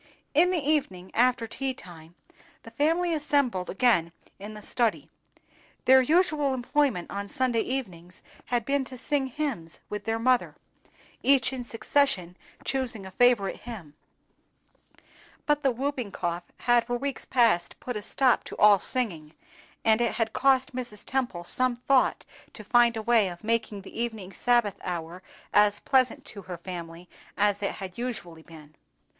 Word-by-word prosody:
In 335 +5 +5
the 365 - +1
evening, 190 -12 -1
after 245 0 +2
tea 260 +3 -4
time, 170 -3 -13 0.5
the 230 - -12
family 330 +7 +1
assembled 280 - 0
again 190 -6 +2 0.3
in 210 +2 -8
the 210 - -9
study. 235 -1 -1 0.7
Their 260 0 +7
usual 300 -2 +2
employment 260 - 0
on 200 0 -4
Sunday 240 +1 +1
evenings 185 -10 -5 0.2
had 240 -2 -1
been 280 +1 +1
to 255 0 -9
sing 270 +2 -1
hymns 250 - -4
with 210 0 -5
their 225 0 0
mother, 250 +2 +1 0.7
each 270 -1 +3
in 255 -2 -4
succession 225 -6 0 0.3
choosing 245 -7 -2
a 190 - -9
favorite 235 -2 +3
hymn; 205 -11 -9 1.5
but 295 -1 +2
the 275 - +3
whooping 255 -3 -3
cough 175 -1 -3 0.2
had 240 -1 +3
for 245 - -1
weeks 275 +2 -4
past 230 -9 +2
put 250 - -5
a 210 - -3
stop 255 +4 +2
to - - -8
all 205 -1 +6
singing, 170 -13 -2 0.5
and 220 +1 +4
it 235 - +1
had 225 -2 -1
cost 265 -1 +2
Mrs. 240 -5 -5
Temple 245 -10 -2
some 255 +7 +1
thought 260 +2 +2 0.3
to 215 - -10
find 235 +1 +4
a 220 - -4
way 230 -3 +4
of 175 +1 -8
making 220 -3 -1
the 225 - -6
evening 220 -5 -4
Sabbath 240 -2 +1
hour 175 0 -5 0.3
as 205 0 +4
pleasant 255 -3 +1
to 200 - -10
her 180 -2 -7
family 170 -1 -8 0.3
as 205 0 +2
it 200 - -1
had 190 +1 -8
usually 175 -10 -5
been. 155 -2 -15
235 Hz, 155 wpm, -27 LUFS, 190-260 Hz, 1.5 s, Their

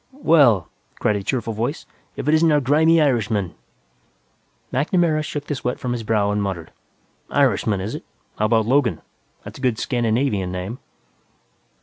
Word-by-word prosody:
"Well," 120 - +5 0.3
cried 105 - +1
a - - -4
cheerful 115 +1 -2
voice, 120 +9 -3 0.3
"if - - -5
it 150 - +3
isn't 160 0 +4
our 150 - +4
grimy 155 +5 +4
Irishman." 110 - +1 1.2
MacNamara 155 +3 +1
shook 145 -1 -5
the 145 - -3
sweat 125 -3 -3
from 125 - -3
his 120 -1 -2
brow 105 -2 +1
and 105 0 0
muttered, 95 -5 -4 0.6
"Irishman, 100 -4 +1
is 100 +4 -4
it? - - -6 0.4
How 105 - +2
about 110 0 +2
'Logan'? 130 0 +1 0.4
That's - - -10
a - - -11
good 125 -4 +1
Scandinavian 115 -6 0
name." 90 +7 -5
120 Hz, 155 wpm, -21 LUFS, 105-145 Hz, 1.2 s, Well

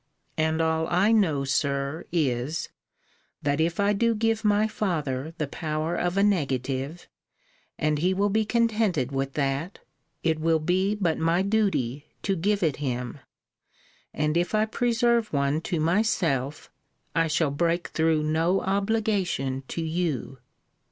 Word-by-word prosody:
And 160 +1 +1
all 160 0 +1
I 185 +6 +3
know, 170 -11 +3
Sir, 140 +2 -1
is, 145 -2 -1 0.7
that 145 +2 +1
if 170 +3 0
I 200 +1 +3
do 230 +3 +2
give 225 0 0
my 210 0 +3
father 160 -8 -2
the 155 - -1
power 155 +3 -3
of 175 +2 -1
a 200 - +4
negative, 140 -4 -1 0.7
and 150 -1 +1
he 180 +4 +2
will 200 +2 +1
be 220 +2 +2
contented 215 - +1
with 135 0 -2
that, 140 +5 -1 0.5
it 160 -1 +1
will 165 +1 +3
be 185 +6 +1
but 175 -6 0
my 165 +3 +2
duty 190 - 0 0.2
to 195 - +1
give 200 +3 0
it 155 -4 +1
him; 125 -1 -3 0.9
and 150 +1 -1
if 175 +5 0
I 215 0 +3
preserve 235 0 +1
one 140 +2 +1
to 175 -3 0
myself, 160 - 0 0.4
I 165 0 +2
shall 160 -2 +1
break 170 +4 0
through 160 -1 +1
no 165 +5 +1
obligation 195 -9 0
to 165 - -3
you. 160 -6 -2
165 Hz, 145 wpm, -26 LUFS, 145-200 Hz, 0.9 s, a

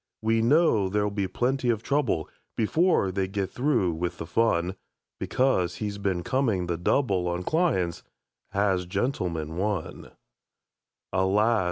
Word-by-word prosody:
We 115 0 +2
know 115 - +3
there'll 105 +1 0
be 100 -2 -1
plenty 125 +4 0
of 115 -2 0
trouble 140 - 0 0.3
Before 120 - +2
they 95 0 -1
get 95 0 -3
through 120 - +1
with 85 +1 -3
the - - -5
fun, 90 -1 +1 0.4
Because 125 -9 +1
he's 105 -1 -4
been 95 -3 -1
coming 115 -7 0
the 85 0 -1
double 95 0 +1
On 90 +1 -2
clients, 95 - 0 0.5
has 95 -3 0
"Gentleman, 90 - -2
One". 100 -3 -3 1.0
Alas! 105 +5 +3
100 Hz, 135 wpm, -26 LUFS, 90-120 Hz, 1.0 s, know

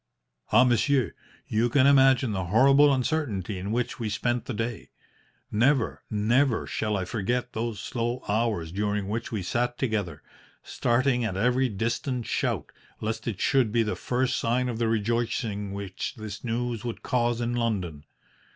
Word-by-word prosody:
"Ah! 125 - +7
monsieur, 125 -1 +2 0.3
you 115 +2 +1
can 135 +2 +4
imagine 135 -3 +5
the 95 -3 -2
horrible 135 +9 +5
uncertainty 125 - -1
in 100 +3 -4
which 125 +4 -2
we 110 -2 -2
spent 120 +3 -1
the 130 - -4
day. 115 +1 -4 0.6
Never, 120 +3 +2
never 115 +4 +2
shall 105 -1 -1
I 95 - -2
forget 120 +4 -2
those 110 -1 -3
slow 120 +1 -3
hours 105 -6 0
during 105 +1 -1
which 110 +3 -3
we 105 -5 -2
sat 120 +6 -1
together, 100 - -2 0.4
starting 125 +1 +1
at 95 -5 -2
every 125 +4 +2
distant 120 +4 -2
shout, - - -1 0.3
lest 110 +1 -3
it 105 -5 -3
should 130 -6 +2
be 115 0 +3
the 105 - -2
first 125 +1 0
sign 125 +2 0
of 115 -2 -4
the 115 - +1
rejoicing 110 -2 -1
which 100 -1 -5
this 110 -2 -7
news 120 -1 -2
would 120 -2 -5
cause 120 -1 +1
in 120 0 -1
London. 95 -11 -2
115 Hz, 160 wpm, -27 LUFS, 105-125 Hz, 0.6 s, Ah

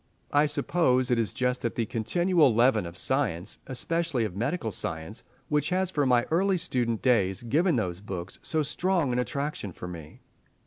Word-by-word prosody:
I 145 +1 +5
suppose 130 -4 +2
it 120 - +3
is 115 - +1
just 125 0 -1
that 115 - -2
continual 150 - +2
leaven 115 -5 +3
of 85 +2 -9
science, 105 - -1
especially 135 0 0
of 95 -4 -5
medical 120 - -1
science, 80 +5 -5 0.3
which 150 -1 +1
has 185 0 0
from 145 -6 +1
my 120 -1 +4
early 190 +3 +3
student 120 -9 -1
days 100 -6 +2
given 155 +8 +2
those 95 -6 -2
books 95 -3 -6
so 155 -1 0
strong 165 -2 0
an 125 - +1
attraction 140 -5 -3
for 90 - -8
me. 80 -4 -10
125 Hz, 170 wpm, -27 LUFS, 105-155 Hz, 0.3 s, I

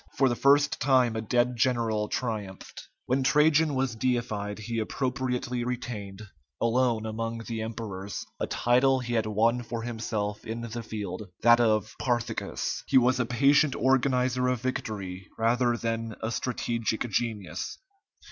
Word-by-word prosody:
For 135 -1 +4
the 120 - 0
first 145 +3 +4
time 130 -4 +3
a 110 - -1
dead 120 +3 +1
general 115 -3 +1
triumphed. 105 -6 -5 0.2
When 130 +2 +1
Trajan 150 +2 +4
was 130 -2 0
deified, 110 -4 -1
he 115 +2 -3
appropriately 125 +1 -2
retained, 110 -5 -5 0.4
alone 115 -1 +1
among 115 +1 -3
the 115 -1 -4
emperors, 105 -3 -5
a - - -1
title 130 +2 +3
he 120 -1 -4
had 110 -2 +1
won 115 +3 +2
for 115 -1 -5
himself 110 -3 -3
in 115 +1 -5
the 115 0 -5
field, 105 -3 -6
that 120 +1 +7
of 110 -4 +2
"Parthicus." 120 -3 -2
He - - +4
was 125 0 +4
a 120 - +1
patient 140 +3 +4
organizer 125 -1 +2
of 125 -2 0
victory 100 -7 -4
rather 120 +1 +2
than 115 -1 -3
a 110 - -3
strategic 115 -2 -2
genius. 100 -6 -2
120 Hz, 145 wpm, -28 LUFS, 110-125 Hz, 0.4 s, that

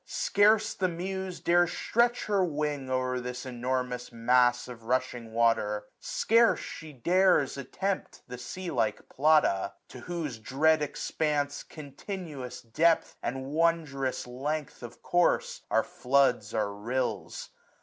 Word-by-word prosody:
Scarce 210 +1 +3
the 185 - 0
Muse 185 +1 -4
840 - - -32
Dares 175 0 +3
stretch 240 +1 +1
her 200 -3 +2
wing 150 -5 -2
o'er 130 0 0
this 125 +1 -6
enormous 125 0 -3
mas3 125 +1 +3
Of 115 -2 -10
rushing 125 -2 -1
water, 110 -2 +1
scarce 230 +1 +3
she 155 -1 -8
dares 175 +2 +3
attempt 190 +9 -4
The 125 -1 -8
sea 180 +7 -6
like 110 -6 -1
Plata; 150 -9 +3 0.2
to - - -10
whose 160 -9 -4
dread 150 +7 +2
expanse. 145 0 -1
Continuous 145 -3 -8
depth, 160 +8 +2
and 130 +2 -3
wondrous 150 -3 0
length 140 +4 -4
of 120 -1 -10
course. 175 0 +1
Our - - +3
floods 125 -5 +1
are 105 -2 0
rills. 120 +5 -3
140 Hz, 130 wpm, -29 LUFS, 125-170 Hz, 0.2 s, Scarce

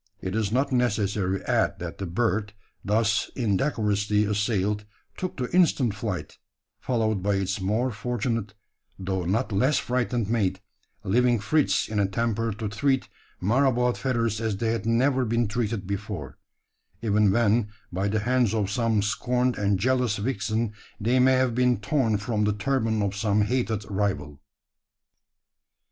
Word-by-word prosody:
It 95 +2 -4
is 110 -2 0
not 135 +4 +1
necessary 100 -6 0
to - - -14
add - - +1
that - - -7
the 95 - -3
bird, 105 +2 -1 0.3
thus 105 0 +1
indecorously 105 -3 +1
assailed, 105 0 0 0.3
took 185 - -5
to 125 +5 -3
instant 145 - +3
flight, 100 -3 -5 0.4
followed 110 -5 0
by 100 +1 +1
its 95 0 -1
more 110 +7 0
fortunate 115 -2 -3 0.4
though 95 -1 -2
not 110 +7 0
less 130 +9 +2
frightened 120 -3 -1
mate 100 -4 0 0.4
leaving 120 +4 +3
Fritz 145 +9 +1
in 105 -1 -2
a 100 - +3
temper 115 +2 -1
to 105 +1 -4
treat 130 +6 0 0.3
Marabout 125 +3 +2
feathers 115 -4 -1
as 110 -3 -1
they 115 +1 0
had 115 -2 -2
never 130 +3 +2
been 115 0 +1
treated 105 -2 -2
before 100 - -5 0.6
even 105 -2 +3
when 110 0 +2 0.2
by 95 +3 0
the 105 +1 0
hands 120 -1 +2
of 105 -2 0
some 115 -2 +1
scorned 125 +4 0
and 100 -1 +1
jealous 125 -1 +1
vixen 110 0 -1 0.3
they 120 +5 +2
may 130 +1 +5
have 130 -2 +2
been 125 -2 +2
torn 115 -1 +1
from 105 0 -1
the 105 - +2
turban 110 -1 0
of 100 0 -1
some 105 0 +1
hated 110 -2 -1
rival! 95 -8 -2
110 Hz, 150 wpm, -26 LUFS, 100-125 Hz, 0.6 s, may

